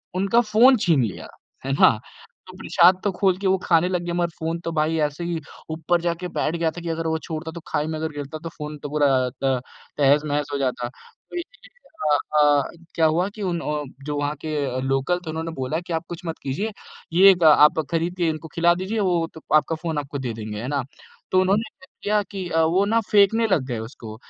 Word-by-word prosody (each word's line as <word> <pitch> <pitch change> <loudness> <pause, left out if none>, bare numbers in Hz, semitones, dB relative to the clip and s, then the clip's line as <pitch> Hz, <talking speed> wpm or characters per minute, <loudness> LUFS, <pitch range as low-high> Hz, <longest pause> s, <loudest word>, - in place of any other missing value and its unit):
उनका 195 +5 +3
फ़ोन 240 +4 +5
छीन 160 -8 +4
लिया। 105 -6 -5 0.4
है 135 - -1
ना? 140 - +6 0.6
तो 185 0 -12
प्रसाद 180 0 +4
तो 205 - +1
खोल 190 0 +1
के 195 0 -2
वो 190 0 +3
खाने 170 +1 +3
लग 180 -2 -1
गए, 175 - -3
मगर 175 0 0
फ़ोन 165 +1 -2
तो 165 - -1
भाई 160 0 0
ऐसे 150 +4 -8
ही 170 -1 -2 0.3
ऊपर 165 +2 0
जाके 170 +1 -2
बैठ 165 -1 -2
गया 165 -1 0
था 175 - -9
कि 170 - -5
अगर 165 0 -2
वो 160 0 0
छोड़ता 160 0 -5
तो - - -5
खाई 150 - -1
में 160 -1 -3
गिरता 145 -1 -5
तो 165 - -4
फ़ोन 150 -1 -7
तो 145 - -4
पूरा 145 0 +2 0.2
अ, - - -2
त 130 -2 +1 0.4
तहस-नहस 145 +1 +2
हो - - 0
जाता। 130 -3 -1
तो 130 - -17
इसी 345 +8 -7
बीच - - -28 0.3
अ 145 - +5 0.2
अ, 145 -1 +3 0.2
क्या 165 - +3
हुआ 165 +4 +2
कि 215 - -8
उन्ह 165 -5 -2 0.2
जो 145 0 -3
वहाँ 145 +1 -1
के 145 -5 -2
लोकल 135 +6 0
थे - - -5
उन्होंने 160 +1 -4
बोला 135 +1 -2
कि 175 0 -6
आप 165 +1 -2
कुछ 175 0 -6
मत 165 -1 -4
कीजिये, 190 +12 -2 0.4
ये 195 +3 +8
आप 150 0 +6
खरीद 170 +2 -1
के 175 -2 +1
इनको 160 +1 -5
खिला 170 +1 +4
दीजिए 190 +5 -3
वो 175 -4 +1
त - - -10
आपका 155 +1 +3
फ़ोन 160 -1 -4
आपको 140 0 -5
दे 125 -3 -3
देंगे, 110 -1 -6
है 120 - -5
ना? 140 -1 -1 0.5
तो 185 - +4
उन्होंने 195 +3 +2 0.2
क्या 270 - -17
किया 210 0 +1
कि 190 -3 -4
अ, 165 -1 +2
वो 175 +5 +3
ना 225 +3 +2
फेंकने 215 +2 +4
लग 185 -9 +2
गए 120 -3 -3
उसको 110 -1 -8
165 Hz, 225 wpm, -23 LUFS, 145-180 Hz, 0.6 s, ये